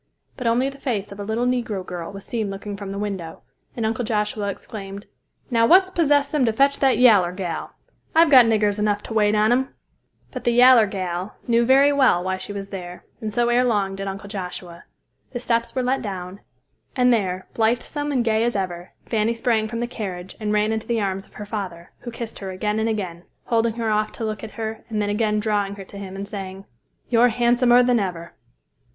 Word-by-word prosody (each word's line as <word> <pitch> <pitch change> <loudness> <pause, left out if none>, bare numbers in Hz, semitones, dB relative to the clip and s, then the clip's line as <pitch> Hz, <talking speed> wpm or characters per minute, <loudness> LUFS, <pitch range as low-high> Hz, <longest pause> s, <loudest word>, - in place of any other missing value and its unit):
But 250 - -3
only 240 +3 +2
the 275 0 -7
face 210 -7 -3
of 200 - -10
a - - -3
little 220 +4 -1
negro 235 -6 -1
girl 175 0 -6
was 195 -1 -10
seen 220 -4 -2
looking 200 +1 -6
from 200 -1 -7
the 200 - -5
window, 195 -5 -5 0.3
and 230 - -1
Uncle 225 +2 -1
Joshua 210 -2 -1
exclaimed, 200 0 -7 0.5
"Now, 230 -1 +4
what's 375 +4 +6
possessed 290 -5 +2
them 300 -3 +2
to 225 - +2
fetch 275 +5 +2
that 270 -2 +3
yaller 205 -8 +5
gal! 180 -3 -5 0.4
I've 325 -1 +6
got 255 -4 +8
niggers 210 -2 +2
enough 210 -1 0
to - - -7
wait 210 -1 +3
on 215 +2 +3
'em." 260 +2 0 0.6
But - - -6
the 240 - +2
"yaller 245 -2 +7
gal" 185 0 -4
knew 235 0 +3
very 275 +2 +5
well 260 -11 +3
why 185 0 -1
she 185 - -7
was 200 -1 -6
there, 180 -2 -8 0.2
and 215 -1 -3
so 240 +2 +1
ere 240 +1 +3
long 205 -5 +1
did 195 0 -5
Uncle 195 +1 -6
Joshua. 180 -3 -7 0.5
The 245 - -3
steps 235 -1 0
were 255 - 0
let 260 +2 0
down, 190 -2 -6 0.6
and 250 -1 +4
there, 190 -4 -1
blithesome 245 +6 0
and 250 -4 +1
gay 220 0 +2
as 240 -1 0
ever, 180 -2 -4
Fanny 225 0 0
sprang 230 -2 +1
from 230 +1 -4
the - - 0
carriage 190 -7 -6
and 210 -1 -2
ran 210 +1 +2
into 220 0 -3
the 235 -1 0
arms 195 -1 -2
of - - -25
her 210 - -7
father, 190 -5 -6
who 240 - -7
kissed 235 -1 -7
her 195 - -6
again 210 +3 -2
and 220 +1 0
again, 185 -6 -3 0.2
holding 230 -1 +1
her 225 -2 -1
off 215 0 +1
to 225 - -4
look 215 -1 -4
at 220 - -5
her 220 0 -4
and 215 -2 -2
then 205 0 0
again 210 0 +1
drawing 205 -2 -1
her 195 - -8
to 200 - -11
him 195 -1 -7
and 200 +1 -5
saying, 195 -1 -7 0.4
"You're 240 +1 +5
handsomer 240 +1 +4
than 245 -1 +3
ever." 170 -4 -4
215 Hz, 220 wpm, -23 LUFS, 195-240 Hz, 0.6 s, got